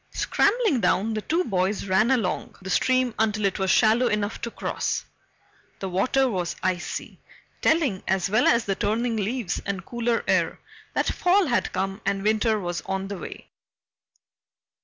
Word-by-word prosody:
Scrambling 415 - +2
down, 200 +4 +1
the 215 - -2
two 335 - 0
boys 195 - -1
ran 195 +4 +3
along 230 -9 0
the 190 - -4
stream 255 +4 +2
until 215 -1 +1
it 195 +1 0
was 190 0 0
shallow 225 +5 +4
enough 210 -1 -1
to 235 - -3
cross. - - -3 0.7
The 190 - -4
water 255 +9 +2
was 180 -7 -2
icy, 185 -1 -3 0.4
telling, 290 - +2
as 190 -1 +1
well 215 +5 +3
as 235 0 +3
the 195 - 0
turning 225 +4 0
leaves 220 0 -2
and 195 -2 -4
cooler 235 -1 -1
air, - - +1 0.4
that - - +1
fall 370 +2 +3
had 245 -6 0
come 195 +2 -3
and 195 0 -1
winter 215 +1 +2
was 175 -3 -3
on 195 0 -2
the 200 -2 -5
way. - - -9
215 Hz, 160 wpm, -25 LUFS, 190-240 Hz, 0.7 s, shallow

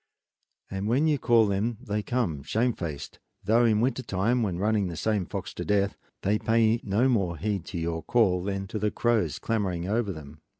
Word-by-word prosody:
And 95 +1 -3
when 130 +7 +2
you 150 -3 +2
call 115 -2 +4
them 105 +3 -1
they 105 -4 -2
come 105 - -1
shamefaced; 85 - -2 0.2
though 115 +3 +4
in 110 -2 +3
winter 130 +1 0
time, 115 +3 0
when 95 -6 -1
running 105 0 +1
the 85 -2 -6
same 105 0 0
fox 100 -2 -5
to - - -5
death, 100 -1 +1 0.3
they 105 +2 +2
pay 115 0 +2
no 105 +6 +2
more 95 -9 +1
heed 100 +1 -2
to - - -6
your 80 0 -2
call 95 -2 +2
than 100 0 -2
to 110 - -3
the 105 +1 +1
crows 120 0 0
clamoring 95 -6 -2
over 110 0 0
them. 75 -2 -10
105 Hz, 195 wpm, -27 LUFS, 90-115 Hz, 0.3 s, call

